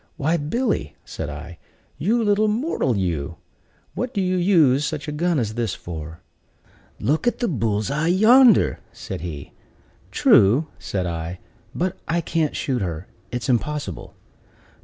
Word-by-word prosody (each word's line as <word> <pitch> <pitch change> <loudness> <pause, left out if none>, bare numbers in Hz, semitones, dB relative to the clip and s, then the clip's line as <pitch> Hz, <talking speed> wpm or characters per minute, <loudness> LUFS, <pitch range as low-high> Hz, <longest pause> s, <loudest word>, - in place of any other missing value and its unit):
"Why, 160 +4 +1
Billy," 170 - -1
said - - -5
I, 75 +3 -8 0.4
"you 225 +8 +1
little 210 0 +3
mortal, 210 - 0
you! 85 -7 -2 0.6
what 250 0 -4
do - - +1
you 185 -1 +1
use 165 -7 +4
such 145 +2 -3
a - - -2
gun 170 +2 0
as 110 -5 -1
this 115 -4 -2
for?" 80 -1 -8 0.8
"Look 150 - 0
at 240 - +2
the 240 - -1
bull's 110 - -1
eye 150 +3 0
yonder!" 220 +6 +5
said - - -7
he. 80 -5 -7 0.6
"True," 115 +11 +4
said 95 -2 -3
I, 85 +1 -4 0.4
"but 185 +2 -1
I 170 +1 +1
can't 165 -2 -1
shoot 130 -4 -1
her; 85 -2 -4 0.3
it 125 -1 -3
is - - -4
impossible." 130 - -2
145 Hz, 150 wpm, -22 LUFS, -, 0.8 s, yonder